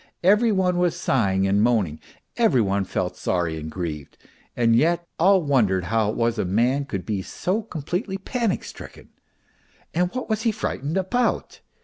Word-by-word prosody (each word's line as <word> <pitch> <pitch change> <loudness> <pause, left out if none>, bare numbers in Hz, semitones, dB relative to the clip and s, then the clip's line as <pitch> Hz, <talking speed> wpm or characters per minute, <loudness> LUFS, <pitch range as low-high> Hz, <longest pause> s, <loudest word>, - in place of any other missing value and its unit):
Every 210 +5 +4
one 180 -3 +1
was 175 -2 +2
sighing 95 -7 +1
and 100 +1 +2
moaning, 105 -10 +1 0.4
every 225 - +3
one 100 -2 +1
felt - - -2
sorry 85 -3 -1
and 80 +1 -6
grieved, 80 -4 -6 0.4
and 115 -1 +4
yet 170 +7 +2
all 190 +1 +5
wondered 110 -11 +2
how 110 +3 +1
it - - -3
was 115 -1 0
a - - +2
man 120 +9 +1
could 100 -9 -5
be 105 -3 -2
so 185 - -2
completely 180 - -4
panic 225 +1 -2
stricken. - - -11 0.8
And 180 +2 +1
what 255 - -3
was 220 -1 -1
he 225 0 +2
frightened 160 - -3
about 235 +7 -1
135 Hz, 165 wpm, -23 LUFS, -, 0.8 s, all